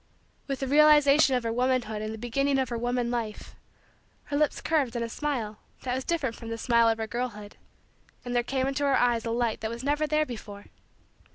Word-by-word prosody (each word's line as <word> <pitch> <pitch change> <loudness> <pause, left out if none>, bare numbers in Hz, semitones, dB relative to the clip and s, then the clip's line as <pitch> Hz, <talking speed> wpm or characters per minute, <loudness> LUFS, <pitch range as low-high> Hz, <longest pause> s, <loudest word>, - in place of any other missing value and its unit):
With 275 -2 -3
the 270 - -1
realization 295 -1 +6
of 250 - -1
her 230 0 -1
womanhood 245 -3 0
and 215 0 -4
the 220 - -6
beginning 270 +5 0
of 260 -3 0
her 235 - -3
woman 240 0 -1
life, 225 -3 -4 0.7
her 285 - -5
lips 300 0 +1
curved 280 -7 0
in 235 - -1
a - - -2
smile 230 -6 -3 0.2
that 250 - -2
was 260 +1 -2
different 280 -8 -1
from 230 - -9
the 230 - -3
smile 235 0 +3
of 225 -1 -1
girlhood 230 -4 -4 0.7
and 245 0 -3
there 240 - +4
came 260 +2 -1
into 275 +1 -1
her 280 -1 +3
eyes 240 -2 +2
a - - -2
light 235 -1 -1
that 220 - -2
was 235 +2 -6
never 295 +2 +1
there 305 0 +2
before. 210 -5 -9
245 Hz, 210 wpm, -27 LUFS, 230-275 Hz, 0.7 s, realization